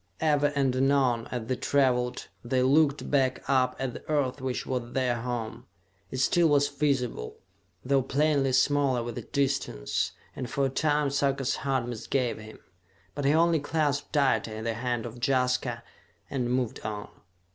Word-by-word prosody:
Ever 150 -2 +3
and 135 -2 +1
anon, 130 -3 +2
as 120 -3 -4
they 130 - -1
traveled 125 -2 +1 0.2
they 125 +1 +1
looked 145 +2 +2
back 130 -2 +1
up 130 -2 +2
at 130 -2 -3
the - - -11
Earth 145 -3 0
which 130 -1 -3
was 125 -2 -3
their 125 -3 0
home. 120 0 -4 0.4
It - - -5
still 170 +6 +3
was 145 -1 +4
visible, 135 - -1 0.5
though 135 +1 +3
plainly 140 0 +1
smaller 135 -3 +2
with 120 -1 -7
distance, 135 - -1 0.2
and 125 - -5
for 140 +2 0
a - - +1
time 150 +1 +1
Sarka's 140 -1 0
heart 135 -3 -1
misgave 120 +1 -2
him; 110 0 -11 0.6
but 145 -1 -3
he 140 - +4
only 165 0 +4
clasped 145 -1 -1
tighter 115 -6 +1
the 115 0 -1
hand 120 0 -2
of 120 +1 -8
Jaska 125 -2 +1 0.5
and 125 -3 -1
moved 125 -2 -1
on. 105 -1 -5
130 Hz, 155 wpm, -28 LUFS, 120-140 Hz, 0.6 s, was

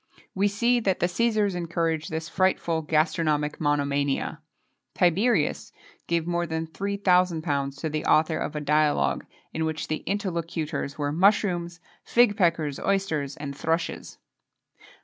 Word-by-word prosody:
We 195 +2 +2
see 235 +4 +2
that 195 -5 0
the - - +2
Cæsars 210 +2 +1
encouraged 165 -2 -2
this 160 0 -4
frightful 180 -3 +1
gastronomic 155 -1 0
monomania. 145 +1 0 0.5
Tiberius 190 +8 +2 0.4
gave 170 -1 0
more 175 0 -1
than 160 0 -2
£3,000 170 -6 0
to 160 - -1
the 155 0 -3
author 155 +1 +3
of 155 - -4
a 150 - -2
dialogue, 150 0 +1 0.3
in 160 - -1
which 160 0 -3
the 155 - 0
interlocutors 170 -7 -3
were 145 -1 -1
mushrooms, 175 -1 +2 0.2
fig 235 -3 +3
peckers, 165 -7 +1
oysters, 160 -8 -1
and 140 -1 -6
thrushes. 165 +3 -2
165 Hz, 130 wpm, -26 LUFS, 155-185 Hz, 0.5 s, author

